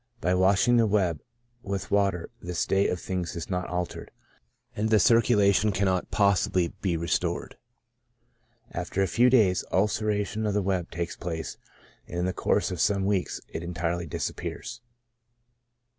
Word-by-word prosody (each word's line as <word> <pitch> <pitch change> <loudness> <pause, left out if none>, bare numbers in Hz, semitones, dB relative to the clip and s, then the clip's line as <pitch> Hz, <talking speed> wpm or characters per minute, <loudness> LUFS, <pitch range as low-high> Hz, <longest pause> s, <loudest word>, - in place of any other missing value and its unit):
By 90 -5 +1
washing 95 +6 +4
the 115 -1 +4
web 95 -6 +1 0.4
with 100 -1 -4
water 100 -4 +1
this 90 -1 -5
state 95 +4 +2
of 90 - -2
things 90 -3 -4
is 85 +3 -6
not 90 -1 -1
altered, 90 0 -4 0.7
and 110 +1 0
the 110 - +5
circulation 105 -1 +4
cannot 95 -2 0
possibly 95 -3 +2
be 90 -4 0
restored. 85 0 -2 1.2
After 95 - -2
a - - +1
few 120 +8 +4
days, 105 -9 +4
ulceration 105 +1 0
cf 105 -2 0
the 105 -1 +1
web 95 -2 -1
takes 85 0 -4
place, 80 -2 -5 0.5
and 85 - -6
in 90 - 0
the 95 - -1
course - - 0
of - - -3
some 100 -1 +2
weeks 100 -2 -1
it - - -5
entirely 85 0 -3
disappears. 110 - -5
95 Hz, 150 wpm, -27 LUFS, 90-105 Hz, 1.2 s, the